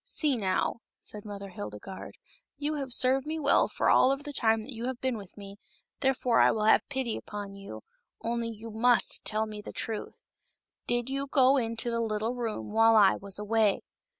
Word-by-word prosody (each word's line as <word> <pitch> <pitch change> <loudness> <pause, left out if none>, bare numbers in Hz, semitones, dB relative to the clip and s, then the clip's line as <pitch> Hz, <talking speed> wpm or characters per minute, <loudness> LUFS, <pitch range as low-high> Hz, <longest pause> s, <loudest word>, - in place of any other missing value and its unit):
" - - -64 0.2
See 295 -4 +2
now," 190 -2 0 0.2
said 210 0 -8
Mother 200 -1 -7
Hildegarde; 105 - -8 0.2
" - - -60
you 295 +1 -2
have 275 -3 -4
served 260 +3 +3
me 315 +1 -2
well 285 -2 +3
for - - -1
all 260 - +5
of 275 +1 -2
the 290 - -7
time 225 -3 +2
that 265 +4 -8
you 235 +2 -4
have 260 -2 -4
been 260 -2 -1
with 200 -3 -10
me, 200 0 -10 0.4
therefore 260 -3 +2
I - - +6
will 215 - 0
have 220 - +5
pity 265 -5 -2
upon 205 -1 -7
you, 200 0 -9 0.4
only 235 0 -2
you 225 0 -8
must 235 +2 +2
tell 215 0 -1
me 210 -1 -7
the - - -8
truth. 220 -2 -4 0.6
Did 240 0 0
you 275 +1 -2
go 265 -1 +4
into 230 -1 -1
the 230 0 0
little 220 +1 -1
room 225 - -4
while 225 +1 +5
I 205 -3 +6
was 195 -1 -3
away 210 -1 +1
225 Hz, 205 wpm, -29 LUFS, 210-260 Hz, 0.6 s, I